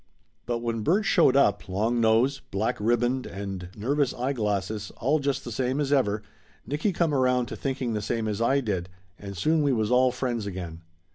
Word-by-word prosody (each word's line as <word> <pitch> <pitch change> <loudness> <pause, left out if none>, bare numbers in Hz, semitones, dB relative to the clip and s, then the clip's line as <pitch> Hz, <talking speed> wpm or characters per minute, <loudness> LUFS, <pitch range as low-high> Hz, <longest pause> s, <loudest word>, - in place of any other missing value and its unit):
But 120 -1 -2
when 115 -1 -1
Bert 190 - +2
showed 130 - +4
up, 105 -6 +2
long 110 +5 0
nose, 115 +5 +3
black 100 +3 -1
ribband 120 +4 +1
and 95 -2 -6
nervous 140 +5 0
eyeglasses, 105 -5 -2
all 145 +6 +1
just 140 -1 -1
the 120 - -5
same 130 +4 -1
as 145 -1 +1
ever, 105 -6 +1 0.4
Nicky 150 +8 0
come 170 -3 0
around 125 -2 +2
to - - -5
thinking 130 -3 -2
the 105 - -1
same 110 +1 -2
as 105 +1 -2
I 135 +4 +3
did, 95 -7 -2 0.3
and 100 -1 -8
soon 155 - +2
we 145 -1 +2
was 110 -1 0
all 125 0 +4
friends 120 -4 -2
again. 85 -4 -6
120 Hz, 190 wpm, -26 LUFS, 105-135 Hz, 0.4 s, showed